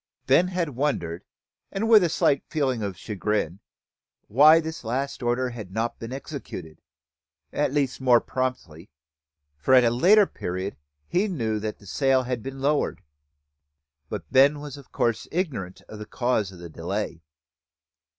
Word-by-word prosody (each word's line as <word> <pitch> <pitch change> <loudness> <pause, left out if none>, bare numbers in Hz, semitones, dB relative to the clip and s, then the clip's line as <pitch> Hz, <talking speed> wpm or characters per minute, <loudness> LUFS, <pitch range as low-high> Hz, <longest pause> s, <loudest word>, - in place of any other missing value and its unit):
Ben 140 +7 +4
had 180 -3 -1
wondered, 120 - -2 0.5
and 200 +3 -1
with 220 -4 +7
a 175 - +2
slight 140 -3 +2
feeling 130 -6 0
of 100 -4 -4
chagrin, 105 -3 -2 0.7
why 150 +8 +7
this 160 -3 -6
last 130 +5 -3
order 125 +1 0
had 110 -6 -8
not 115 +3 -2
been 115 +1 -7
executed, 130 - -7 0.7
at - - +1
least 140 -2 -1
more 125 -2 +6
promptly, 115 -12 -4 0.7
for 130 - +4
at 125 - +7
a 115 - +3
later 195 - +6
period 95 - -4 0.3
he 195 +4 +1
knew 115 - -1
the 105 -1 -6
sail 135 +5 +2
had 125 -2 -3
been 135 +2 -7
lowered; 140 -7 0 1.1
but - - -5
Ben 140 +3 +5
was 145 -2 -7
of 140 -3 -14
course 115 -2 0
ignorant 130 - -3
of 110 - -10
the 105 - -8
cause 120 -6 0
of 95 - -12
the 85 0 -9
delay. - - -4
125 Hz, 150 wpm, -25 LUFS, 105-145 Hz, 1.1 s, with